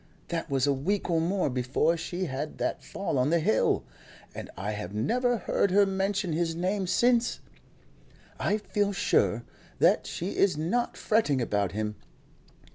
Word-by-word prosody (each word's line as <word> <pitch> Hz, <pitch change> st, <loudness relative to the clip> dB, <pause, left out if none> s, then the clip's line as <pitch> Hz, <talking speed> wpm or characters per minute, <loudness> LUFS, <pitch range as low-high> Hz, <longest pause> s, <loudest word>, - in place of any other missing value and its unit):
That 165 Hz, -1 st, -3 dB
was 135 Hz, -1 st, +2 dB
a 140 Hz, -, +3 dB
week 180 Hz, +8 st, -1 dB
or 165 Hz, -1 st, +2 dB
more 185 Hz, +3 st, +1 dB
before 130 Hz, +5 st, +1 dB
she 175 Hz, +2 st, -3 dB
had 145 Hz, 0 st, -4 dB
that -, -, -2 dB
fall 195 Hz, -9 st, -2 dB
on 125 Hz, +3 st, +2 dB
the 170 Hz, -, +3 dB
hill, 130 Hz, -9 st, +2 dB, 0.5 s
and -, -, -7 dB
I 100 Hz, +3 st, -3 dB
have 105 Hz, -2 st, -5 dB
never 245 Hz, -, +1 dB
heard 200 Hz, -, +1 dB
her 200 Hz, +2 st, +5 dB
mention 195 Hz, -2 st, -1 dB
his 165 Hz, 0 st, 0 dB
name 185 Hz, +3 st, -1 dB
since. 235 Hz, +6 st, +2 dB, 1.0 s
I 210 Hz, -, +1 dB
feel 205 Hz, -1 st, -1 dB
sure 120 Hz, -, +2 dB, 0.3 s
that -, -, +3 dB
she 180 Hz, +4 st, -4 dB
is 190 Hz, -6 st, +3 dB
not 210 Hz, +11 st, -1 dB
fretting 210 Hz, -, +2 dB
about 100 Hz, -6 st, 0 dB
him. 105 Hz, 0 st, -3 dB
170 Hz, 160 wpm, -28 LUFS, 130-200 Hz, 1.0 s, her